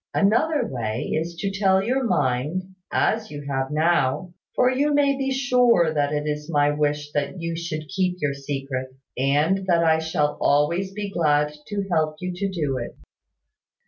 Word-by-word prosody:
Another 245 +7 +2
way 115 -3 -3
is 165 +2 -2
to 195 +3 -2
tell 195 -1 +3
me 195 - -2
your 260 +3 +1
mind, 150 - 0 0.2
as 220 0 +1
you 145 -1 -7
have 135 -1 -1
now; 165 +2 +1 0.2
for 250 0 +4
you 285 +3 +1
may 280 -1 +3
be 270 0 -2
sure 250 - +3
that 145 -1 +1
it 150 0 -1
is 150 +1 -3
my 145 -2 +3
wish 150 0 -1
that 145 +4 -2
you 165 0 -3
should 160 -2 -4
keep 180 +4 -1
your 145 -3 0
secret, 135 -2 -4 0.3
and 150 +9 +1
that 170 -2 +3
I 160 -1 +4
shall 150 -2 -1
always 170 +7 +2
be 205 0 -5
glad 150 -4 +2
to 200 -1 -3
help 155 -2 +1
you 180 0 -4
to 195 +2 -2
do 150 -8 -2
it. 120 - -7
165 Hz, 175 wpm, -24 LUFS, 145-195 Hz, 0.3 s, for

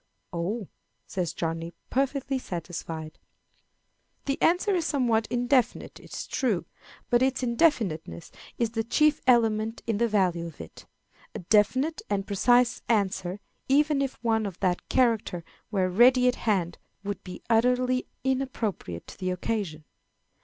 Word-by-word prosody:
"Oh!" 190 +5 -2 0.4
says 180 -4 -2
Johnny, 165 +1 -4 0.2
perfectly 270 0 0
satisfied. 165 -5 -6 1.1
The 275 -1 -2
answer 360 +4 +3
is 350 -3 +1
somewhat 240 -8 +1
indefinite, 245 0 0
it - - -16
is - - -5
true, 220 -11 -1 0.5
but 240 0 +4
its 265 0 +1
indefiniteness 225 - 0 0.3
is 230 -2 0
the 225 -1 -1
chief 300 +6 +2
element 225 -2 +2
in 225 -3 -1
the 235 - +3
value 180 -6 +1
of 160 - -12
it. - - -11 0.5
A - - -3
definite 260 +10 +3
and 200 -1 0
precise 240 +4 +3
answer, 190 -3 0 0.3
even 290 +1 +3
if 270 -1 -2
one 220 -2 +1
of 185 -3 -8
that 180 -2 0
character 225 -8 +1 0.3
were 190 -3 +1
ready 250 +7 +5
at 250 - +4
hand, 190 -6 -1 0.2
would 205 0 -4
be 180 - -9
utterly 250 +2 +2 0.2
inappropriate 255 - -2
to - - -12
the 185 -1 -1
occasion. 180 -4 -3
225 Hz, 140 wpm, -27 LUFS, 185-255 Hz, 1.1 s, ready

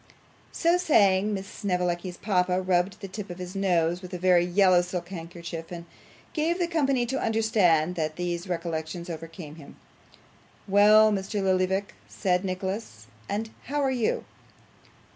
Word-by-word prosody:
So 345 +1 +2
saying 205 - +3
Miss 195 -2 -3
Snevellicci's 180 -3 -2
papa 180 -3 +1
rubbed 185 +1 0
the 195 - -5
tip 195 +1 -7
of 175 - -7
his 180 +1 -7
nose 175 -3 +1
with 180 0 -7
a - - -3
very 180 -1 +4
yellow 180 0 +4
silk 175 -1 -5
handkerchief, 170 -2 -7
and 170 -1 -7 0.5
gave 325 +2 0
the 355 - +1
company 275 -7 +1
to 265 +3 -2
understand 200 -8 +2
that 155 -3 -2
these 175 +1 -3
recollections 170 0 -4
overcame 165 -1 -8
him. 145 -3 -13 0.9
'Well, 210 +2 +6
Mr. 195 0 -2
Lillyvick,' 190 +1 +1 0.2
said 180 -2 0
Nicholas, 190 - -4 0.2
'and 220 +2 -3
how 290 +3 -2
are 270 - +2
you? 245 -4 -1
185 Hz, 145 wpm, -26 LUFS, 175-210 Hz, 0.9 s, Well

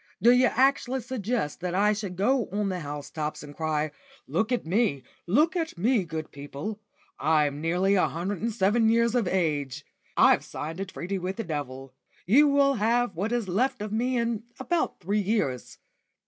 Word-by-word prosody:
"D' 235 - +6
you 250 +1 +5
actually 265 +1 +2
suggest 235 - -3
that 180 0 -2
I 210 +2 +4
should 200 -3 -5
go 235 +5 +1
on 205 0 -1
the 185 -1 -2
housetops 150 0 -5
and 145 -1 -11
cry, 155 -1 -1 0.3
'Look 220 +2 -1
at 245 - 0
me, 175 - +1 0.2
look 300 - +3
at 325 - -2
me, 215 +1 +2
good 160 -1 -5
people; 145 +9 -6 0.4
I'm 150 -1 +2
nearly 180 +4 +2
a 190 - +3
hundred 180 +3 -4
and 230 +1 0
seven 220 +3 +2
years 235 0 +3
of 240 -6 +1
age; 150 -8 -1 0.3
I've - - +5
signed 160 +4 -6
a 195 - -2
treaty 190 +1 -4
with 185 +1 -3
the 225 - -3
devil. 135 -6 -5 0.3
He 235 +11 +6
will 280 -1 +4
have 230 -2 +1
what 200 +7 -2
is 240 -4 -1
left 245 +9 0
of 210 0 -5
me 250 +3 0
in 230 -2 -1 0.2
about 345 -2 -1
three 200 +4 0
years. 185 - -1
200 Hz, 180 wpm, -27 LUFS, 160-235 Hz, 0.4 s, D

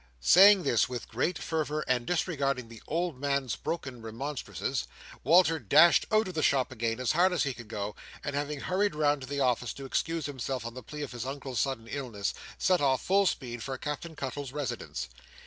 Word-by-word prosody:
Saying 190 - +7
this 120 -6 +2
with 125 -2 -5
great 160 +9 -1
fervour, 155 -2 -2
and 125 -2 +1
disregarding 140 -8 -1
the 115 -2 -12
old 165 -3 -2
man's 140 -3 0
broken 130 -7 -5
remonstrances, 125 +6 -4 0.4
Walter 165 +2 +5
dashed 160 - +5
out 215 -1 +3
of 185 - -5
the 160 - -1
shop 135 -4 +2
again 115 -1 -2
as 130 - +1
hard 180 +4 +4
as 180 - +1
he 140 - -1
could 120 -2 -11
go; 105 -1 -4 0.3
and, 145 - -3
having 145 0 -2
hurried 190 -1 0
round 145 -2 +2
to 130 - -7
the 140 +1 -2
office 120 -3 +1
to 135 - -8
excuse 165 +3 -1
himself 130 -3 -4
on 115 - -5
the 130 - -8
plea 150 +5 -7
of 140 - -6
his 120 -2 -5
Uncle's 135 -3 -4
sudden 130 -3 -1
illness, 115 -7 -3 0.2
set 180 -3 +2
off, 135 -2 +2
full 195 +1 +4
speed, 120 -7 -3
for 135 +1 -4
Captain 150 +4 -5
Cuttle's 140 -1 -5
residence. 130 - -4
140 Hz, 200 wpm, -29 LUFS, 125-160 Hz, 0.4 s, Saying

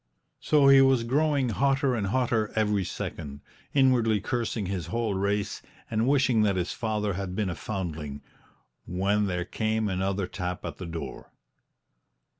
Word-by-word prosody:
So 145 -2 +4
he 135 0 +8
was 135 -3 +4
growing 140 +1 +1
hotter 135 +5 +2
and 105 -5 -1
hotter 115 -1 +1
every 105 -3 +1
second, 70 -5 -6 0.3
inwardly 125 -6 +3
cursing 115 -1 -2
his 90 -3 -3
whole 110 +3 -1
race 100 +1 -1 0.3
and 110 +2 +1
wishing 135 -5 +3
that 100 -2 +2
his 90 -1 -1
father 105 -3 -1
had 95 0 -4
been 105 -3 -1
a - - -4
foundling 80 -8 -5 0.6
when 100 +3 +1
there 90 -2 -2
came 110 +3 -1
another 95 0 -1
tap 90 -1 -5
at - - -5
the 90 - -6
door. 80 -3 -7
105 Hz, 150 wpm, -27 LUFS, 95-120 Hz, 0.6 s, he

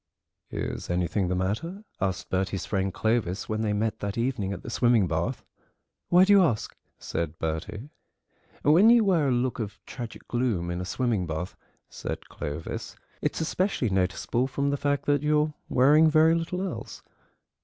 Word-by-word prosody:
"Is - - -4
anything 90 +2 0
the 90 - 0
matter?" 110 - -2 0.2
asked 95 -1 -2
Bertie's 95 0 -1
friend 95 -2 -1
Clovis 110 -3 0
when 110 0 -1
they 110 -1 0
met 110 +1 -1
that 100 +1 -4
evening 115 -5 -1
at 100 - -6
the - - -6
swimming 120 -4 +3
bath. 80 +1 -2 0.6
"Why 180 +2 +7
do 205 - +5
you 200 - +7
ask?" 120 -11 -1 0.2
said 80 -1 -4
Bertie. 95 - -4 0.7
"When 170 +10 +6
you 235 -1 +6
wear 175 -8 +3
a - - +2
look 125 +1 0
of 105 -2 -4
tragic 120 -3 -8
gloom 115 -9 0
in 85 +1 -3
a - - -4
swimming 110 -3 0
bath," 80 +4 -4 0.3
said - - -6
Clovis, 75 +2 -5 0.3
"it's - - -1
especially 160 - 0
noticeable 95 +7 0
from 140 +1 -1
the - - +1
fact 145 0 -1
that 145 -1 +2
you're 150 0 +2 0.2
wearing 150 +5 +5
very 155 +1 +5
little 170 +3 -1
else. 120 - -7
115 Hz, 165 wpm, -27 LUFS, 95-150 Hz, 0.7 s, Why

